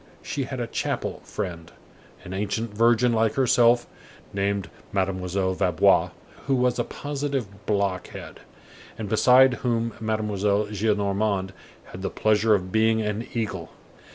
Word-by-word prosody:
She 135 - -3
had 130 0 -5
a 120 - -1
chapel 115 - -3
friend, 85 -5 -6 0.5
an 90 - -7
ancient 105 +3 -2
virgin 120 +2 +4
like 110 -1 +2
herself, 120 -2 +4 0.5
named 100 -1 -1 0.2
Mademoiselle 95 0 -1
Vaubois, 90 -4 +3 0.4
who 135 - +3
was 125 -1 +1
a - - +2
positive 135 -7 -4
blockhead, 100 -3 -2 0.6
and 110 - -4
beside 125 +5 +5
whom 115 -2 0
Mademoiselle 105 -2 0
Gillenormand 100 -2 0 0.4
had 90 - -8
the 95 - -2
pleasure 110 0 +3
of 95 -2 -3
being 110 +1 +3
an 105 +2 -3
eagle. 95 -7 -3
105 Hz, 125 wpm, -25 LUFS, 100-115 Hz, 0.6 s, beside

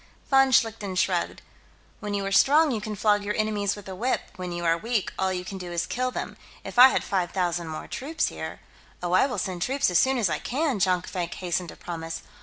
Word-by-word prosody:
Von 270 0 +6
Schlichten 225 -6 +1
shrugged. 180 -1 0 0.6
"When 210 -2 -3
you 200 -1 -2
are 195 - -2
strong, 295 +8 +5
you 220 -4 -2
can 210 0 -4
flog 205 0 +2
your 210 +1 -2
enemies 210 -2 0
with 205 -2 -11
a 190 - -6
whip; 240 +8 0
when 180 -1 -5
you 175 0 -4
are 165 0 +4
weak, 220 +4 -2
all 190 0 +1
you 180 -1 -3
can 195 0 -6
do 180 -1 -7
is 170 -1 -1
kill 255 +1 -1
them. - - -5 0.3
If - - -3
I 255 - +12
had - - 0
five 185 -3 -1
thousand 175 -3 -1
more 155 -1 -6
troops, 310 +5 -2
here...." - - -7 0.4
"Oh, 175 - -1
I 185 +9 +4
will 250 - -4
send 185 -3 -3
troops, 270 0 +1
as 175 - +4
soon 265 0 +3
as 225 -5 +2
I - - -1
can," 275 -3 -1
Jonkvank 180 -1 0
hastened 180 -1 -2
to - - -10
promise. 165 -1 -6
195 Hz, 230 wpm, -26 LUFS, 180-240 Hz, 0.6 s, I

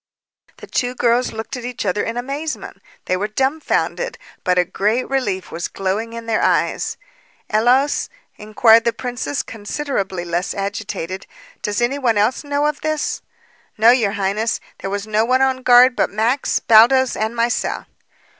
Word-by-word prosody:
The - - -10
two 250 0 -2
girls 245 0 +2
looked 220 +5 -6
at 245 - -8
each 245 -2 -5
other 200 +2 0
in 230 +1 -3
amazement. 280 +6 -5 0.2
They 185 - 0
were 200 +3 -1
dumbfounded, 275 - -1 0.3
but 180 -1 +1
a 180 - +4
great 215 +8 0
relief 210 -9 -2
was 170 +1 -3
glowing 200 +4 -3
in 230 0 -7
their 225 -1 0
eyes. - - 0 0.5
"Ellos," 250 +6 +2 0.3
inquired 220 +2 +4
the 235 0 +1
princess, 245 - -3
considerably 205 -5 -4
less 170 +2 -2
agitated, 195 -2 -4 0.3
"does 210 +2 -2
any 260 +4 0
one 235 -5 +1
else 215 +8 +1
know 285 0 0
of 300 -1 -1
this?" 310 -1 -2 0.6
"No, 225 +2 +7
your 225 -6 +2
highness, 205 +3 -1 0.2
there 195 - -4
was 200 +1 -3
no 215 0 +1
one 255 +3 +2
on 260 -1 +1
guard 250 0 +6
but - - +1
Max, 230 +6 0
Baldos, 240 +3 +5
and 220 +2 -2
myself." 235 +1 -1
230 Hz, 160 wpm, -19 LUFS, 205-255 Hz, 0.6 s, No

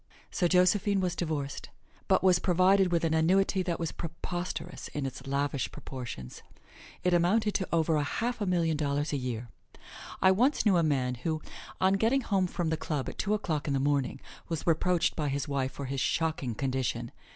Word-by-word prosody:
So 180 - +1
Josephine 195 +3 +3
was 180 -2 -1
divorced, 150 -5 -3 0.4
but - - +3
was 185 -2 +5
provided 185 +1 +3
with 170 -1 +1
an 160 -1 +1
annuity 185 +4 +3
that 175 -2 -2
was 165 -2 -2
preposterous 175 +2 -5
in 145 -2 -4
its 130 0 -6
lavish 140 -1 -1
proportions. 120 - -8 0.6
It 180 - +2
amounted 200 +5 +3
to 190 - 0
over 160 -2 +2
half 230 +10 -2
a 205 - 0
million 170 -3 +1
dollars 145 0 -1
a - - +1
year. 125 -2 -4 0.7
I 190 - +5
once 250 +9 +2
knew 200 -3 +5
a - - +4
man 135 -5 +1
who, 160 +2 -1 0.4
on 190 +1 +4
getting 250 +5 +3
home 195 -6 +1
from 175 -2 -2
the 160 - 0
club 150 -4 -3
at - - -10
two 210 +1 +1
o'clock 155 -8 -2
in 140 - +1
the - - +1
morning, 140 -1 0 0.3
was 165 -3 -3
reproached 170 +1 +2
by 150 -3 -1
his 140 0 -2
wife 135 -2 -1
for 140 - -6
his 135 0 -2
shocking 155 -8 0
condition. 130 0 -2
165 Hz, 185 wpm, -29 LUFS, 140-185 Hz, 0.7 s, was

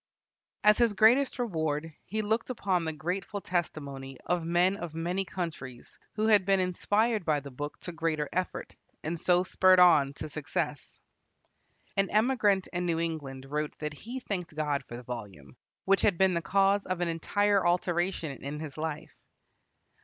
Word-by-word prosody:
As 210 +2 +6
his 235 -3 +4
greatest 245 +8 +4
reward 160 - -2
he 215 +3 -2
looked 220 +4 0
upon 190 -8 0
the 160 - -1
grateful 180 +7 -3
testimony 140 -8 -4
of 175 -1 0
men 175 +3 +2
of 170 -4 -7
many 175 +4 -1
countries 160 -9 -6 0.2
who 215 0 0
had 210 -3 +5
been 195 0 +3
inspired 205 +4 +1
by 155 -3 +1
the 140 0 -10
book 145 +3 -6
to 175 - -6
greater 165 -3 -1
effort, 185 0 -3 0.3
and 165 +2 -3
so 180 +1 +3
spurred 185 0 +4
on 150 -6 +6
to - - -6
success. 150 -1 -4 1.0
An 195 0 +2
emigrant 210 -4 +2
in 175 0 -1
New 165 -1 0
England 145 -5 -4
wrote 150 +2 -3
that 150 -1 -4
he 235 - -7
thanked 180 -9 -4
God 150 -2 -1
for 120 - -7
the 125 - -9
volume, 100 - -8 0.3
which 195 0 +3
had 195 -5 +3
been 190 0 +4
the 170 - 0
cause 195 +3 +2
of 185 -1 -2
an 175 - +1
entire 200 +4 +1
alteration 175 -2 0
in 145 +2 -5
his 155 -1 -7
life. 160 0 -4
175 Hz, 170 wpm, -29 LUFS, 150-195 Hz, 1.0 s, As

